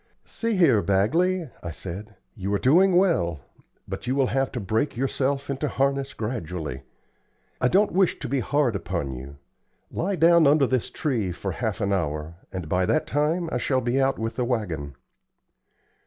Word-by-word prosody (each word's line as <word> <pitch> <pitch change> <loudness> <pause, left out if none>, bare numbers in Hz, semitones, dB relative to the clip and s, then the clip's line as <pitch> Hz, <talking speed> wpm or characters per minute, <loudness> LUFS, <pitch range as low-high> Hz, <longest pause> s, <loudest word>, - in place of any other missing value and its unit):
"See 230 -1 -2
here, 140 - +5
Bagley," 150 - +1
I 85 - -5
said, 95 +5 -7 0.2
"you 100 -2 -4
are - - +3
doing 175 - +4
well, 125 - +2 0.5
but - - -6
you 130 - +1
will 135 -1 +3
have 135 0 +1
to 125 - -2
break 110 +7 -1
yourself 135 +2 -1
into 140 +2 -2
harness 140 0 0
gradually. 90 - -4 0.8
I 125 - +4
don't 200 +9 +3
wish 185 0 +2
to 140 - -5
be 135 +2 0
hard 135 -3 +1
upon 85 -7 -3
you. 65 +3 -9 0.5
Lie 195 +3 -1
down 170 -1 +5
under 145 0 +5
this 130 -2 0
tree 125 - -1
for 95 +3 -4
half 110 +4 -3
an 100 0 +1
hour, 75 -3 -2 0.2
and 90 -4 -5
by 90 +3 +1
that 155 - +2
time 155 +4 0
I - - 0
shall 130 -2 +1
be 125 +2 0
out 135 0 +2
with 115 0 -4
the 125 - +1
wagon." 85 - -2
125 Hz, 175 wpm, -25 LUFS, 95-145 Hz, 0.8 s, here